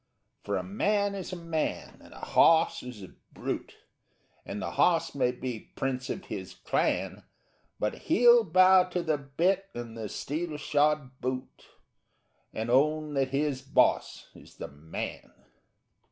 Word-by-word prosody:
For 100 -1 -1
a 90 - -3
man 200 - 0
is 195 -2 -6
a - - -4
man 165 -3 -3
and - - -16
a - - -9
hawse 165 0 +4
is 125 -5 -9
a 95 - -11 0.2
brute, - - -5 0.7
And - - -5
the - - -4
hawse - - +2
may 125 - +1
be 125 -2 -6
prince 130 -1 -2
of 190 - -4
his 95 -3 -7
clan - - -1 0.6
But 105 - 0 0.2
he'll 240 0 +6
bow 185 0 +6
to 180 -1 -3
the 155 -3 0
bit 180 +8 0
and 120 -1 -6
the 110 -2 -5
steel 155 - -4
shod 145 -3 0
boot 130 +1 -5 0.8
_And 110 +2 -4
own 150 +3 +2
that 135 -1 +1
his 140 0 -1
boss 135 - +1
is - - -16
the - - -7
man. 75 +3 -7
145 Hz, 150 wpm, -29 LUFS, 125-175 Hz, 0.8 s, he'll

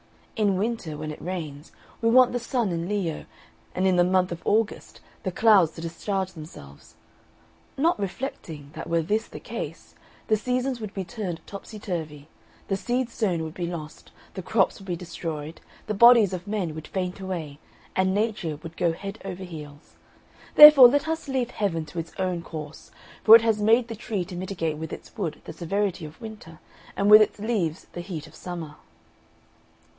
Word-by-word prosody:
In 205 -4 +2
winter, 200 -7 -2
when 155 0 -5
it 150 - -9
rains, 160 -5 -6 0.3
we 230 - +3
want 250 +1 +6
the 245 - -1
sun 235 -3 -1
in 170 +1 -3
Leo, 190 -7 -2 0.5
and 185 - 0
in 185 -1 +3
the 175 - +6
month 185 0 +2
of 170 - -5
August 220 0 -1 0.2
the 185 - -3
clouds 195 -5 +5
to - - -9
discharge 190 +3 -3
themselves; 150 - -12 0.8
not 325 +1 +2
reflecting, 180 - -5
that - - -7
were 165 -1 +1
this 215 +7 -1
the - - -9
case, - - -7 0.3
the 215 - +4
seasons 250 +2 -1
would 210 -2 -7
be 195 - -2
turned 185 -4 -6
topsy 205 +2 -9
turvy, 160 -8 -5 0.4
the 195 - 0
seed 245 +4 -1
sown 180 -9 -1
would 160 -1 -6
be 175 -1 -3
lost, 160 -3 -8 0.2
the 190 - -5
crops 195 +1 +1
would 195 - -13
be 175 - -1
destroyed, 165 -2 -6 0.2
the 215 - -2
bodies 230 -2 +7
of 180 +1 -5
men 200 -6 -2
would 155 0 -8
faint 185 0 -3
away, 170 -7 -5 0.4
and 190 0 +2
Nature 205 -7 -1
would 165 0 -9
go 170 -1 +1
head 195 +5 -7
over 190 -1 -6
heels. 150 -4 -10 0.6
Therefore 300 -4 +12
let 285 +5 +1
us 320 -1 -3
leave 260 -3 -1
Heaven 165 -6 -1
to 170 +2 -6
its 165 - -6
own 185 -2 -1
course; 155 -2 -9 0.3
for 220 - +10
it 230 - +6
has 220 -2 +1
made 225 +3 +4
the 230 - -6
tree 205 -4 -3
to 185 - -9
mitigate 175 -4 -3
with 160 0 -6
its - - -9
wood 175 -9 -3
the - - -7
severity 185 +1 -2
of 155 +1 -12
winter, 210 -8 -10 0.4
and 200 +1 +3
with 215 +1 +11
its 215 - +2
leaves 200 -7 -2
the 175 - -5
heat 175 -4 -6
of 155 - -16
summer." 160 -2 -7
185 Hz, 185 wpm, -25 LUFS, 165-215 Hz, 0.8 s, Therefore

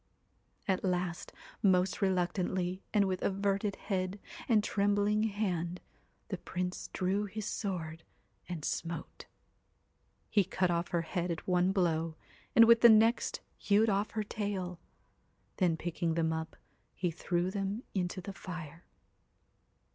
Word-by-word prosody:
At 190 -2 +1
last, 180 -2 -1 0.3
most 185 -1 +3
reluctantly, 185 0 0
and 205 -1 +4
with 185 -1 -1
averted 200 +1 0
head 190 0 -2 0.3
and 215 -3 +5
trembling 205 +1 +2
hand, 180 -5 -1 0.5
the - - -3
Prince 180 0 -4
drew 195 +3 0
his 210 +1 -5
sword 165 -7 -3 0.5
and 165 -4 -4
smote. 170 0 -4 1.0
He 205 -2 +3
cut 185 0 0
off 170 +1 0
her 170 -1 0
head 175 +1 -2
at 170 - -4
one 180 0 +3
blow, 165 -4 +1 0.4
and 230 - +9
with 230 0 +6
the 235 - +10
next 225 +2 +4 0.2
hewed 210 +2 +3
off 200 +2 +1
her 215 - +1
tail. 195 -4 -3 0.8
Then 175 -4 +2
picking 170 -1 -1
them 160 -1 +1
up, 160 0 -4 0.4
he 175 -2 -1
threw 175 +2 -1
them 200 +3 -2
into 185 -1 -2
the 195 +2 -7
fire. 170 -3 -8
185 Hz, 130 wpm, -32 LUFS, 175-200 Hz, 1.0 s, the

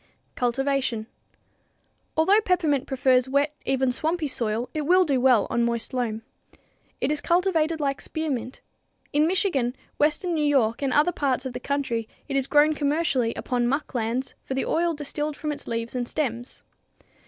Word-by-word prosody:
Cultivation. 255 -2 0 1.1
Although 390 +7 +5
peppermint 325 -9 +1
prefers 260 -1 +2
wet, 285 +2 +1
even 265 -1 +2
swampy, 315 +4 -1
soil, 230 -2 -1
it 310 - -1
will 365 +1 +5
do 275 -5 +1
well 250 -5 +5
on 235 - +2
moist 235 0 -2
loam. 225 -3 -2 0.8
It 265 - 0
is 300 -1 -1
cultivated 335 -2 +1
like 275 -2 -1
spearmint. 275 -6 -3 0.5
In 300 +2 +4
Michigan, 310 - +1 0.2
western 305 +4 +2
New 310 -2 +1
York 265 -6 +2
and 275 -2 0
other 300 +6 +4
parts 275 -5 -1
of 260 - -4
the 250 - -4
country 250 -5 -2 0.2
it 275 - -3
is 270 -1 +1
grown 300 +1 +4
commercially 285 -5 +1
upon 245 -2 -1
muck 280 +4 -2
lands 240 +2 -2
for 265 - -4
the 265 - 0
oil 335 0 +1
distilled 295 0 -4
from 300 - -3
its 295 - -8
leaves 230 0 -3
and 245 -1 -2
stems. 245 -4 -4
275 Hz, 165 wpm, -25 LUFS, 245-305 Hz, 1.1 s, Although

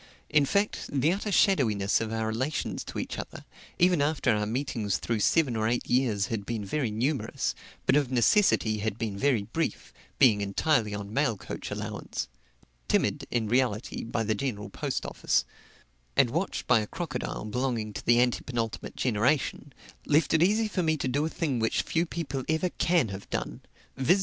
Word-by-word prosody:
In 150 -1 +5
fact, 200 +5 0
the 145 +4 +2
utter 205 +2 -3
shadowyness 110 - +3
of 110 -1 -3
our 110 0 -1
relations 125 +7 -2
to - - -7
each - - -4
other, - - -8 0.3
even 180 -3 +4
after 145 -4 +2
our 105 0 0
meetings 110 -5 -1
through 115 +8 -2
seven 130 +3 +3
or 110 0 +1
eight 120 +1 -1
years 120 -6 +2
had 105 0 -3
been 110 -1 -4
very 135 +3 -1
numerous, 125 +7 -1 0.3
but 130 - +4
of 145 -4 +2
necessity 120 - +3
had 110 0 -2
been 110 -4 -3
very 120 -1 +2
brief, 160 +11 -3 0.2
being 115 -7 +5
entirely 105 +2 +1
on 100 +1 -6
mail 135 -5 +1
coach - - -6
allowance - - -4 0.6
timid, - - +1
in 115 -3 0
reality, 120 -2 0
by 115 0 -2
the 110 0 +1
General 105 -3 -3
Post - - -3
Office - - 0 0.7
and 135 -4 +5
watched 170 +6 -2
by 125 -3 +5
a 105 - -3
crocodile 165 -7 -4
belonging 115 -1 -2
to - - -6
the 120 0 +4
antepenultimate 120 -2 -1
generation, 130 +4 0 0.4
left 150 +2 +3
it 160 - +4
easy 215 +5 +3
for 200 -3 -1
me 160 -2 +1
to 135 - -2
do 140 +4 +1
a - - -4
thing 145 -7 -1
which 110 0 +1
few 170 +1 0
people 140 -6 -4
ever 160 +3 +1
can 165 -9 +2
have 100 0 -8
done - - -3 0.3
viz. 160 +9 +3
125 Hz, 180 wpm, -28 LUFS, 110-150 Hz, 0.7 s, In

